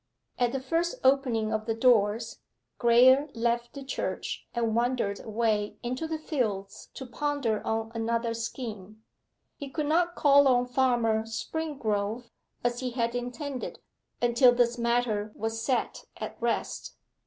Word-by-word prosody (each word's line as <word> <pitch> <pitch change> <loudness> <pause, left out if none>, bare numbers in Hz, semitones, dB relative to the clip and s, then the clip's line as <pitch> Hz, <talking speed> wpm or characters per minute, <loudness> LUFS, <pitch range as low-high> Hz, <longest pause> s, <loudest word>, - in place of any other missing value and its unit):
At 245 -1 +2
the 270 - -2
first 330 +6 -1
opening 250 -5 +2
of 215 +1 -2
the 225 - 0
doors, 225 -1 +2 0.4
Graye 260 +4 +6
left 235 +1 -1
the 280 - -7
church 270 - -4
and 230 -2 0
wandered 235 -4 0
away 215 -2 0
into 255 +6 -3
the 320 0 -2
fields 215 -11 -3
to 265 - -6
ponder 255 -3 -1
on 225 0 -2
another 230 0 -1
scheme. 220 -3 -6 0.5
He 280 - -7
could 305 +2 -2
not 345 +3 +2
call 285 -1 +6
on 250 -1 +4
Farmer 240 -4 +1
Springrove, 230 -4 -3 0.3
as 240 0 0
he 255 -1 -2
had 235 -1 -1
intended, 245 +2 -4 0.5
until 240 +1 +6
this 240 -1 +3
matter 235 -3 0
was 225 +1 -3
set 255 -3 -1
at - - -6
rest. - - -2
240 Hz, 140 wpm, -28 LUFS, 225-265 Hz, 0.5 s, Graye